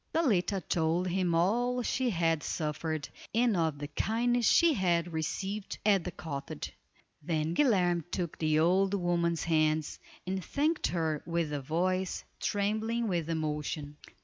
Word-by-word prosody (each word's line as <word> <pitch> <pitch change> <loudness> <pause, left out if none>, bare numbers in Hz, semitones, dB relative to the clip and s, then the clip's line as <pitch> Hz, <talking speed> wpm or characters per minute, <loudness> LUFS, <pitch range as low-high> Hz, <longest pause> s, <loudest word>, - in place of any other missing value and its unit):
Zaletta 205 - +2
told 170 +2 +1
him 180 -1 +1
all 240 +8 +2
she 255 +1 0
had 165 -5 +1
suffered, 155 0 -3 0.3
and 235 -2 +3
of 160 -4 0
the 145 0 -5
kindness 235 +8 +1
she 335 -2 +5
had 175 - +1
received 190 +6 -3
at 200 -4 +4
the 180 - -3
cottage. 145 -4 -6 0.5
Then 155 0 -1
Guilerme 180 - +3
took 175 -3 -3
the 155 -1 +2
old 190 +5 +3
woman's 170 -2 0
hands 155 -1 +1 0.3
and 190 0 -2
thanked 305 - 0
her 160 -3 -1
with 170 -3 -1
a 145 - -2
voice 185 +6 -1 0.2
trembling 220 +3 0
with 170 -3 -1
emotion. 150 -2 -3
175 Hz, 140 wpm, -30 LUFS, 160-200 Hz, 0.5 s, she